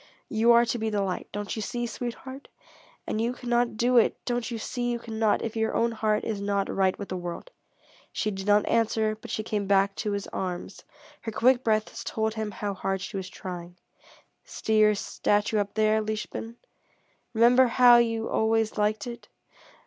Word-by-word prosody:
You 225 Hz, +1 st, +4 dB
are 235 Hz, 0 st, +6 dB
to 235 Hz, 0 st, -2 dB
be 220 Hz, 0 st, -1 dB
the 205 Hz, -2 st, 0 dB
light 185 Hz, -2 st, -3 dB
don't 205 Hz, 0 st, -4 dB
you 220 Hz, -, -4 dB
see, 240 Hz, +2 st, -3 dB
sweetheart? 250 Hz, +3 st, -6 dB, 0.6 s
And 215 Hz, -, -2 dB
you 235 Hz, +2 st, 0 dB
cannot 240 Hz, -2 st, 0 dB
do 245 Hz, +2 st, +3 dB
it, 230 Hz, -, +4 dB
don't 245 Hz, -1 st, -1 dB
you 235 Hz, -, -4 dB
see 245 Hz, +2 st, -3 dB
you 240 Hz, -, 0 dB
cannot, 220 Hz, -2 st, 0 dB
if 225 Hz, -1 st, -4 dB
your 220 Hz, 0 st, 0 dB
own 235 Hz, 0 st, +2 dB
heart 215 Hz, -1 st, 0 dB
is 210 Hz, -3 st, -3 dB
not 200 Hz, -1 st, -1 dB
right 190 Hz, -1 st, +2 dB
with 200 Hz, -, -7 dB
the 185 Hz, -, -3 dB
world?" 175 Hz, -, -6 dB, 0.6 s
She 215 Hz, -, -1 dB
did 195 Hz, 0 st, -6 dB
not 205 Hz, 0 st, +4 dB
answer, 220 Hz, -1 st, +1 dB
but 215 Hz, -, -12 dB
she 215 Hz, -, -2 dB
came 210 Hz, -2 st, -2 dB
back 195 Hz, 0 st, +3 dB
to 210 Hz, -2 st, -2 dB
his 200 Hz, -1 st, -3 dB
arms. 185 Hz, 0 st, -5 dB, 0.4 s
Her 225 Hz, -, -4 dB
quick 250 Hz, +3 st, +3 dB
breath 215 Hz, -1 st, 0 dB
told 220 Hz, 0 st, -1 dB
him 220 Hz, -1 st, -3 dB
how 205 Hz, 0 st, -4 dB
hard 195 Hz, 0 st, -2 dB
she 200 Hz, -, -6 dB
was 190 Hz, -1 st, -4 dB
trying. 175 Hz, -1 st, -8 dB, 0.7 s
"See 220 Hz, 0 st, -1 dB
your 210 Hz, 0 st, +5 dB
statue 205 Hz, +1 st, 0 dB
up 205 Hz, 0 st, -3 dB
there, 215 Hz, 0 st, +3 dB
liebchen? 215 Hz, +1 st, -5 dB, 0.8 s
Remember 245 Hz, +3 st, +6 dB
how 245 Hz, 0 st, +7 dB
you 230 Hz, -1 st, +1 dB
always 220 Hz, -1 st, +1 dB
liked 210 Hz, 0 st, +1 dB
it? 235 Hz, -1 st, -8 dB
220 Hz, 190 wpm, -27 LUFS, 205-235 Hz, 0.8 s, how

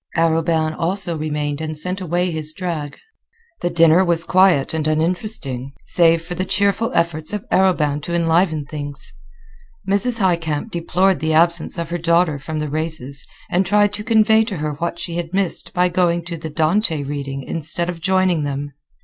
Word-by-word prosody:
Arobin 165 Hz, -1 st, +1 dB
also 175 Hz, 0 st, -2 dB
remained 150 Hz, -1 st, -3 dB
and 155 Hz, -1 st, -4 dB
sent 180 Hz, +5 st, -2 dB
away 180 Hz, +1 st, 0 dB
his 155 Hz, -1 st, -4 dB
drag. 155 Hz, -5 st, -4 dB, 0.6 s
The 175 Hz, -, 0 dB
dinner 165 Hz, +1 st, +5 dB
was 170 Hz, -2 st, +1 dB
quiet 180 Hz, -6 st, +3 dB
and 155 Hz, -1 st, -1 dB
uninteresting, 155 Hz, -, -2 dB
save 165 Hz, -1 st, +3 dB
for 175 Hz, +1 st, -6 dB
the 180 Hz, +1 st, -2 dB
cheerful 200 Hz, +4 st, +1 dB
efforts 170 Hz, 0 st, 0 dB
of 210 Hz, -, -4 dB
Arobin 155 Hz, -6 st, +2 dB
to 170 Hz, +3 st, -3 dB
enliven 165 Hz, -2 st, +1 dB
things. 145 Hz, -1 st, -5 dB, 0.7 s
Mrs. 205 Hz, +5 st, +1 dB
Highcamp 170 Hz, -1 st, 0 dB
deplored 175 Hz, +1 st, +1 dB
the 160 Hz, +2 st, 0 dB
absence 170 Hz, +1 st, +2 dB
of 170 Hz, 0 st, -4 dB
her 175 Hz, -, -2 dB
daughter 170 Hz, -2 st, +2 dB
from 155 Hz, +3 st, -5 dB
the 150 Hz, 0 st, -2 dB
races, 155 Hz, -3 st, -3 dB, 0.2 s
and 180 Hz, +2 st, +3 dB
tried 205 Hz, +2 st, +2 dB
to 210 Hz, -, -1 dB
convey 220 Hz, -1 st, +4 dB
to 205 Hz, -5 st, -4 dB
her 150 Hz, 0 st, -2 dB
what 170 Hz, +4 st, -3 dB
she 170 Hz, 0 st, -4 dB
had 175 Hz, +1 st, -4 dB
missed 195 Hz, -3 st, -1 dB
by 180 Hz, -1 st, +2 dB
going 175 Hz, -1 st, +1 dB
to 175 Hz, -1 st, -5 dB
the 160 Hz, -, -6 dB
"Dante 160 Hz, +1 st, +1 dB
reading" 140 Hz, -1 st, -5 dB
instead 165 Hz, +3 st, +1 dB
of 175 Hz, -2 st, -5 dB
joining 185 Hz, -2 st, +2 dB
them. 145 Hz, 0 st, -4 dB
170 Hz, 175 wpm, -20 LUFS, 155-185 Hz, 0.7 s, dinner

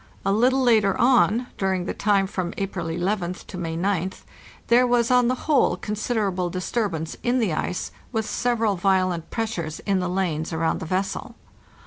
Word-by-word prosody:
A 195 Hz, -, +2 dB
little 255 Hz, +6 st, +3 dB
later 215 Hz, -5 st, +3 dB
on, 240 Hz, -2 st, +4 dB
during 190 Hz, -2 st, 0 dB
the -, -, -2 dB
time 200 Hz, -2 st, +2 dB
from 185 Hz, -2 st, -4 dB
April 190 Hz, -4 st, -3 dB
11th 180 Hz, +2 st, -2 dB
to -, -, -10 dB
May 165 Hz, -2 st, -3 dB
goth, 185 Hz, 0 st, -2 dB, 0.4 s
there 245 Hz, +2 st, +4 dB
was 240 Hz, 0 st, +2 dB
on 250 Hz, -1 st, +5 dB
the 255 Hz, +1 st, -2 dB
whole 300 Hz, -3 st, +3 dB
considerable 210 Hz, -4 st, -1 dB
disturbance 180 Hz, -3 st, -2 dB
in 245 Hz, +1 st, +1 dB
the 220 Hz, -9 st, +1 dB
ice, 180 Hz, +3 st, -3 dB, 0.2 s
with 220 Hz, -3 st, -1 dB
several 230 Hz, -3 st, 0 dB
Niolent 185 Hz, -2 st, +1 dB
pressures 185 Hz, -9 st, -3 dB
in 195 Hz, -2 st, 0 dB
the 180 Hz, -1 st, -1 dB
lanes 175 Hz, -4 st, -1 dB
around 160 Hz, 0 st, 0 dB
the -, -, -6 dB
vessel. 195 Hz, +6 st, -2 dB
195 Hz, 165 wpm, -24 LUFS, 180-230 Hz, 0.4 s, on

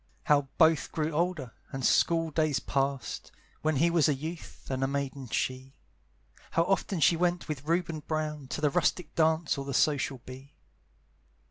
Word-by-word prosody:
How 145 Hz, -2 st, +3 dB
both 160 Hz, -4 st, +4 dB
grew 155 Hz, 0 st, -1 dB
older, 160 Hz, -6 st, -1 dB, 0.2 s
and 135 Hz, -2 st, -3 dB
school 165 Hz, -1 st, +3 dB
days 155 Hz, -2 st, +1 dB
passed, 135 Hz, -1 st, -2 dB, 0.3 s
When 155 Hz, 0 st, +1 dB
he 165 Hz, +5 st, +3 dB
was 165 Hz, -2 st, +4 dB
a 145 Hz, -, +2 dB
youth, 160 Hz, +4 st, -8 dB
and 130 Hz, 0 st, -1 dB
a -, -, +2 dB
maiden 140 Hz, -1 st, -3 dB
she; 130 Hz, +3 st, -3 dB, 0.7 s
How 165 Hz, -, +2 dB
often 195 Hz, 0 st, 0 dB
she 165 Hz, -, +5 dB
went 175 Hz, +1 st, 0 dB
with 145 Hz, -2 st, -5 dB
Reuben 165 Hz, -1 st, 0 dB
Brown 150 Hz, -2 st, -3 dB
To 150 Hz, -, -4 dB
the 150 Hz, -2 st, +3 dB
rustic 180 Hz, -, 0 dB
dance 160 Hz, -2 st, +2 dB
or 135 Hz, -, -5 dB
the 140 Hz, -2 st, -3 dB
social 140 Hz, -3 st, +2 dB
bee. 135 Hz, +3 st, -11 dB
150 Hz, 165 wpm, -29 LUFS, 135-165 Hz, 0.7 s, she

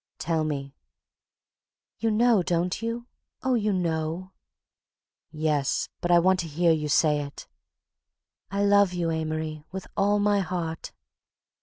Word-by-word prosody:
"Tell 160 Hz, -1 st, 0 dB
me..." 140 Hz, -3 st, -3 dB, 1.3 s
"You 225 Hz, -, +1 dB
know, 225 Hz, -1 st, +4 dB
don't 175 Hz, +3 st, -1 dB
you? 230 Hz, +1 st, -3 dB, 0.4 s
Oh, 260 Hz, -, +2 dB
you 215 Hz, -3 st, +1 dB
know." 170 Hz, 0 st, -2 dB, 1.0 s
"Yes, 150 Hz, -3 st, 0 dB
but 175 Hz, -, -2 dB
I 175 Hz, -, +6 dB
want 185 Hz, +2 st, +4 dB
to 170 Hz, -, -2 dB
hear 165 Hz, +3 st, +2 dB
you 155 Hz, -2 st, 0 dB
say 150 Hz, 0 st, +3 dB
it." 140 Hz, 0 st, -9 dB, 1.0 s
"I 200 Hz, +1 st, 0 dB
love 200 Hz, -2 st, +4 dB
you, 170 Hz, -2 st, -1 dB
Amory, 155 Hz, -1 st, -3 dB
with 190 Hz, 0 st, -6 dB
all 205 Hz, +1 st, +3 dB
my 205 Hz, 0 st, +2 dB
heart." 170 Hz, -3 st, -3 dB
175 Hz, 135 wpm, -26 LUFS, 155-200 Hz, 1.3 s, I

